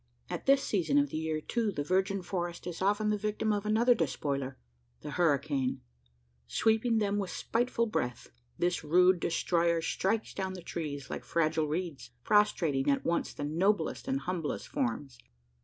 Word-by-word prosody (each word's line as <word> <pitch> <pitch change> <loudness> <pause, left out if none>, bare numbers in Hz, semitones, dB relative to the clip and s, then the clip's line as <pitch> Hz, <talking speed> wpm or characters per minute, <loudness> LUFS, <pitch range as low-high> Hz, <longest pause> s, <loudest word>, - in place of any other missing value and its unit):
At - - -5
this 275 0 +5
season 205 - +1
of 285 0 +3
the - - -2
year, 160 -1 -1
too, 225 +4 -1
the 145 -6 -3
virgin 190 +3 0
forest 175 -2 -4
is 175 -1 -5
often 205 +2 +2
the 210 - 0
victim 215 +1 0
of 205 0 -2
another 230 +3 +5
despoiler 140 - -2 0.4
the 150 - -6
hurricane. 145 -6 +1 0.7
Sweeping 225 - +2
them 205 -1 +1
with 195 -2 -2
spiteful 235 0 0
breath, 125 - -3 0.3
this 175 -1 0
rude 180 +4 +4
destroyer 170 0 +1
strikes 195 +6 -1
down 190 -1 -3
the 180 - -9
trees 145 -6 -5
like - - -4
fragile 160 -1 +1
reeds 150 -6 -4
prostrating 165 - +2
at 140 - +1
once 170 - 0
the - - -6
noblest 185 - 0
and 270 0 0
humblest 175 -4 -3
forms. 250 - -2
180 Hz, 160 wpm, -31 LUFS, 155-210 Hz, 0.7 s, this